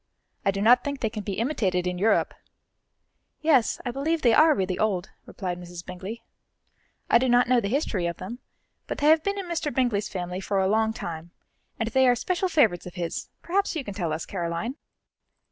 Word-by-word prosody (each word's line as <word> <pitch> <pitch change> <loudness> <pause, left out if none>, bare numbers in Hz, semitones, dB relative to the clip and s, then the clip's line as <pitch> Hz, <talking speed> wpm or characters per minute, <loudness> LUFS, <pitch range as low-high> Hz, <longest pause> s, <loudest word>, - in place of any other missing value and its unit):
I 195 - +2
do 195 +1 0
not 245 +3 +6
think 280 -1 -3
they 220 - 0
can 215 -1 -4
be 200 -1 -4
imitated 195 -8 0
in 180 0 -2
Europe." 220 +3 +2 1.1
"Yes, 285 -7 +3
I 245 - -1
believe 305 +5 -1
they 235 -2 +5
are 310 0 +6
really 185 -1 -1
old," 195 -5 0 0.2
replied 180 -2 -4
Mrs. 175 0 -9
Bingley. 190 +5 -7 0.8
"I 235 - +5
do 260 +1 +1
not 245 0 +4
know 250 0 +4
the 205 - -2
history 210 - 0
of 170 - -4
them, 215 +7 -7 0.5
but - - -4
they 295 - +3
have 315 0 +6
been 400 +4 -2
in 395 - -4
Mr. 335 -4 -2
Bingley's 235 -5 0
family 180 -1 -4
for 195 +1 -2
a 190 - +2
long 220 +2 +2
time, 170 -5 -6 0.5
and 225 - -1
they 260 +2 +4
are 245 - +5
special 365 +8 -1
favourites 215 - +2
of 175 - -10
his; 170 -2 -4
perhaps 390 +1 0
you 310 - -2
can 205 - -6
tell 175 -5 -2
us, 155 +1 -3
Caroline?" 175 +6 -3
220 Hz, 205 wpm, -26 LUFS, 180-265 Hz, 1.1 s, not